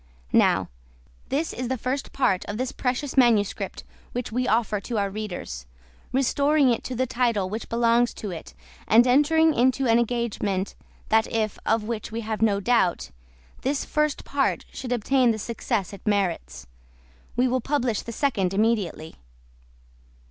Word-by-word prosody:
Now, - - +4 0.6
this 300 +4 -1
is 250 0 -4
the 260 +1 -1
first 260 +4 -3
part 190 -9 +1
of 205 - -5
this 255 +1 -2
precious 260 +2 -2
manuscript 235 -6 +2 0.3
which 245 -1 -3
we 250 +2 0
offer 220 -3 +1
to 235 +2 -4
our 200 -1 0
readers, 175 - -6 0.4
restoring 280 +1 +3
it 235 - -1
to 255 - -4
the 260 +2 +1
title 235 -6 0
which 220 +2 -5
belongs 235 +1 +3
to 205 - -5
it, - - -9 0.3
and 230 +3 +6
entering 310 +5 +4
into 260 +2 +2
an 230 -1 +4
engagement 220 -5 -1 0.4
that 220 0 +3
if 215 -2 -1
(of 225 -1 +2
which 220 0 -4
we 230 +1 -3
have 220 -1 -4
no 205 -3 +3
doubt) 200 -4 +1 0.5
this 275 +1 -1
first 300 -1 0
part 275 -1 0
should 250 -2 -6
obtain 250 +2 +2
the 225 - +1
success 220 -2 -3
it 200 - -10
merits, 170 - -1 0.7
we 250 +2 +3
will 255 0 0
publish 250 -5 0
the 235 - -7
second 200 -8 0
immediately. 205 -7 0
235 Hz, 155 wpm, -25 LUFS, 210-255 Hz, 0.7 s, and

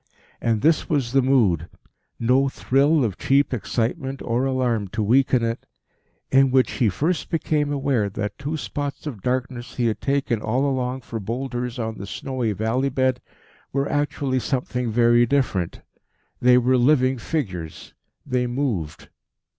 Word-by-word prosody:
And 115 -2 +1
this 160 0 +3
was 135 -7 0
the 135 +1 +4
mood, 110 - +2 0.5
no 130 +4 +3
thrill 140 +3 +2
of 100 -5 -4
cheap 140 0 +2
excitement 130 - -2
or 120 +2 0
alarm 125 -6 0
to 110 +3 -2
weaken 125 +2 +3
in, 115 0 0 0.7
in 135 0 +5
which 130 0 +3
he 120 -5 +1
first 160 - -1
became 150 -3 0
aware 135 -7 0
that 105 +1 -5
two 145 +3 -3
spots 140 +4 -5
of 125 -10 -6
darkness 125 +1 -3
he 120 - 0
had 110 -2 -1
taken 135 -5 0
all 125 +6 0
along 130 -1 -1
for 115 -2 -6
boulders 125 +3 -4
on 110 -2 -4
the 100 - -6
snowy 125 0 -3
valley 115 +7 0
bed, 130 -1 0 0.5
were 140 +1 0
actually 145 -3 0
something 125 0 -2
very 120 +1 +4
different. 115 -10 0 0.6
They 125 0 +6
were 125 +1 +3
living 130 0 +3
figures. 95 - -4 0.3
They 125 -2 0
moved. 120 - -3
125 Hz, 150 wpm, -23 LUFS, 115-135 Hz, 0.7 s, They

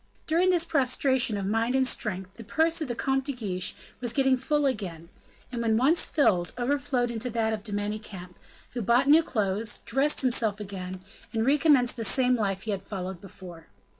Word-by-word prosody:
During 340 +4 +2
this 345 -2 +2
prostration 260 -6 +2
of 195 - -3
mind 225 +5 0
and 265 0 +3
strength, 190 -6 -3
the 230 - -11
purse 320 +9 +1
of 310 - -2
the 240 - -3
Comte 270 +2 0
de 280 - -2
Guiche 195 -7 -3 0.2
was 240 -2 -2
getting 265 -1 +3
full 290 +3 0
again, 175 -11 -3 0.4
and 240 -2 -3
when 220 -1 +2
once 300 +8 +3
filled, 180 - +1
overflowed 250 -1 0
into 235 +2 -3
that 225 -1 0
of 210 -2 -5
De 215 - -8
Manicamp, 205 -3 -5 0.4
who 240 - -4
bought 240 +6 +3
new 305 +3 +7
clothes, 210 -5 -1
dressed 275 +4 +2
himself 230 -5 +1
again, 185 -2 -7 0.3
and 225 0 0
recommenced 275 -3 +3
the 230 - -3
same 250 +2 +3
life 195 -4 -2
he 220 - -3
had 195 -2 -3
followed 190 -2 -6
before. 180 -4 -12
235 Hz, 190 wpm, -27 LUFS, 200-270 Hz, 0.4 s, new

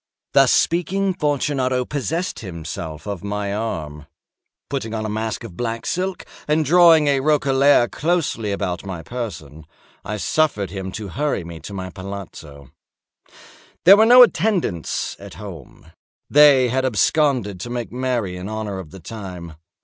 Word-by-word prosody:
Thus - - +5
speaking, 190 +3 +1
Fortunato 140 -5 0
possessed 160 +6 -3
himself 80 -4 -7
of 100 -4 -5
my 100 0 -3
arm. 75 -9 -4 0.6
Putting 115 -5 -4
on 110 0 -3
a - - -3
mask 110 +1 -3
of 105 -7 -9
black 115 +1 -3
silk, 185 0 -2 0.2
and 155 +1 +2
drawing 165 0 +6
a 140 -1 +2
roquelaire 140 -3 +3
closely 150 - -1
about 95 -3 -3
my 95 -4 -6
person, 80 - -7 0.4
I 105 - -4
suffered 105 - 0
him 95 -1 -5
to 105 -3 -6
hurry 145 -3 -2
me 85 -1 -9
to 100 - -9
my 95 -1 -5
palazzo. 80 -8 -9 1.1
There 190 +3 +10
were 220 +1 +5
no 250 +1 +10
attendants 185 - 0
at - - -11
home; 85 - -11 0.4
they 140 -4 +6
had 130 +2 0
absconded 125 - +1
to 120 - -6
make 120 -1 -4
merry 120 -7 -2
in 90 +3 -6
honor 110 -3 -4
of 90 -5 -9
the 95 - -12
time. 90 -4 -8
110 Hz, 150 wpm, -21 LUFS, 95-145 Hz, 1.1 s, There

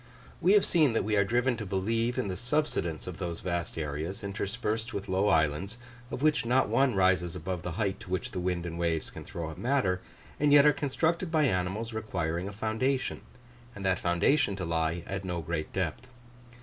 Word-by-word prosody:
We 185 +4 +5
have 205 -2 +6
seen 155 -8 +3
that 115 - +1
we 105 +1 0
are 100 - +5
driven 120 +5 +1
to 110 - -4
believe 115 +5 0
in - - 0
the 95 - -2
subsidence 120 - -1
of 90 -2 -7
those 85 -3 -4
vast 85 -2 -3
areas, 80 +5 -3
interspersed 110 +3 -2
with 100 - -4
low 95 +2 +2
islands, 80 +4 +1 0.3
of 135 - -4
which 155 -1 +3
not 125 +3 +2
one 135 -4 +3
rises 90 -2 +2
above 90 0 -4
the 90 0 -4
height 100 0 -1
to - - -11
which 95 -1 -2
the - - -3
wind 90 -1 -1
and 85 0 -5
waves 85 -2 -1
can - - -8
throw 80 -2 -5
up - - -10
matter, 115 -8 +1 0.4
and 150 0 +3
yet 145 0 +8
are 150 - +7
constructed 165 +5 0
by 155 -2 +3
animals 105 0 0
requiring 90 -5 -2
a - - -5
foundation, 110 +6 -1 0.5
and 100 -1 -6
that 95 -1 +2
foundation 100 - +2
to 95 -2 -4
lie 80 0 0
at 95 0 -4
no 90 -2 -2
great 80 -1 -3
depth. 95 +6 -2
95 Hz, 200 wpm, -29 LUFS, 85-120 Hz, 0.5 s, yet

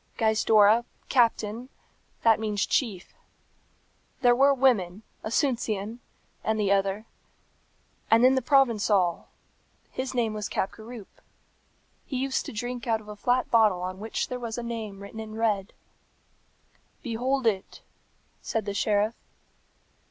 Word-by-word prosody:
Gaizdorra, 220 0 +4 0.3
Captain, 235 -1 +1 0.5
that 225 -1 +5
means 210 -2 -1
chief. 205 -9 -1 1.1
There 245 -1 +5
were 275 +3 +5
women, 225 -8 +2 0.2
Asuncion, 230 -3 -1 0.4
and 220 0 0
the 200 -2 +1
other. 195 +2 +1 1.0
And 225 +2 +5
then 255 +1 +6
the 260 - +1
Provençal. 215 - +2 0.7
His 260 0 -4
name 230 -3 +1
was 210 -2 -4
Capgaroupe. 220 +2 -6 0.9
He 265 - -3
used 265 +1 -1
to - - -5
drink 245 +2 -5
out 225 -1 +2
of 210 - -14
a 210 - -7
flat 245 +4 0
bottle 215 -6 +4
on 185 +1 -5
which 220 +2 -3
there 250 -1 -5
was 230 -1 -5
a 240 - -4
name 220 -4 -5
written 200 +2 -9
in 220 -1 -7
red." 215 -3 0 1.3
"Behold 255 +2 -1
it," 200 -4 -1 0.6
said 225 -2 -2
the 200 - -3
sheriff. 210 +2 +1
225 Hz, 130 wpm, -27 LUFS, 205-245 Hz, 1.3 s, then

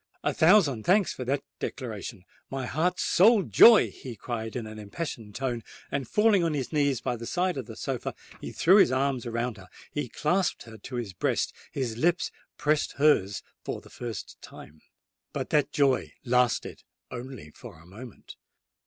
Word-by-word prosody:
"A - - +1
thousand 160 - +4
thanks 195 +1 +3
for 130 - -6
that 135 +3 -1 0.2
declaration, 110 -5 -6 0.3
my 135 -1 -3
heart's 160 +9 0
sole 210 +2 +5
joy!" 230 +3 +7
he 125 -3 -9
cried 110 0 -5
in 120 -3 -3
an 110 0 -9
impassioned 105 -1 -6
tone; 125 -4 -2 0.3
and, 140 -3 -2
falling 210 - +3
on 165 -2 0
his 135 +1 -3
knees 140 -4 +1
by 125 - -1
the 115 0 -7
side 180 0 0
of 130 -5 -5
the - - -9
sofa, - - -4 0.3
he - - -6
threw 185 +4 +5
his 195 - +6
arms 130 -2 0
around 115 0 -2
her—he 100 - -7
clasped 180 - 0
her 110 -1 -12
to 130 - -8
his 115 -6 -4
breast—his 115 +6 -2
lips 170 +6 +1 0.3
pressed 150 0 +1
hers 110 -10 +2 0.2
for - - -4
the - - -17
first 115 -4 -7
time. 75 +1 -13 0.5
But - - -4
that 150 -1 +2
joy 140 -3 +1
lasted 125 -1 +1 0.3
only 125 - -8
for 80 - -12
a 85 - -18
moment. 110 +6 -12
130 Hz, 170 wpm, -27 LUFS, 115-155 Hz, 0.5 s, joy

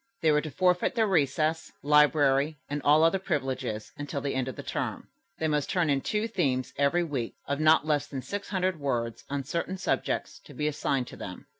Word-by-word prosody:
They 160 - +5
were 150 0 +3
to 155 - -5
forfeit 180 - +2
their 225 -2 +3
recess, 160 -3 +1
library 150 0 +4
and 145 0 -3
all 150 +2 +5
other 165 +4 +4
privileges 130 - -3
until 145 -1 -4
the 140 0 -2
end 130 -1 -1
of 130 - -5
the - - -7
term. - - -4 0.3
They 160 - 0
must 150 -2 0
turn 170 -5 +2
in 135 -1 +1
two 210 +7 -1
themes 135 - -1
every 145 +5 +2
week 135 -8 -3
of 140 +1 -1
not 155 -1 +5
less 145 -2 +1
than 135 -3 -6
six 200 -1 -5
hundred 185 -3 0
words 120 -5 -2
on 140 0 -2
certain 170 +6 -3
subjects - - -2
to - - -13
be 150 - -1
assigned 140 -3 0
to - - -11
them. 90 -2 -8
150 Hz, 205 wpm, -28 LUFS, 135-165 Hz, 0.3 s, They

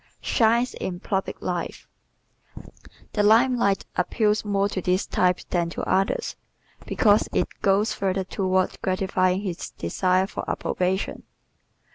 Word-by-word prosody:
Shines 235 +1 +2
in 175 -2 -5
Public 195 0 -3
Life - - -4 0.7
¶ - - -14 0.4
The 210 - +1
lime 230 +5 +5
light 200 -5 +1
appeals 210 +3 +1
more 200 -1 +1
to 190 - -3
this 185 +2 +1
type 180 -1 +1
than 170 -2 +1
to - - -5
others 190 +1 0 0.5
because 210 -2 +3
it - - +1
goes 200 +2 +2
further 190 -1 -1
toward 185 0 -1
gratifying 185 0 +1
his 185 -4 -4
desire 185 - 0
for 195 - -6
approbation. 185 +2 -1
195 Hz, 130 wpm, -24 LUFS, 185-210 Hz, 0.7 s, lime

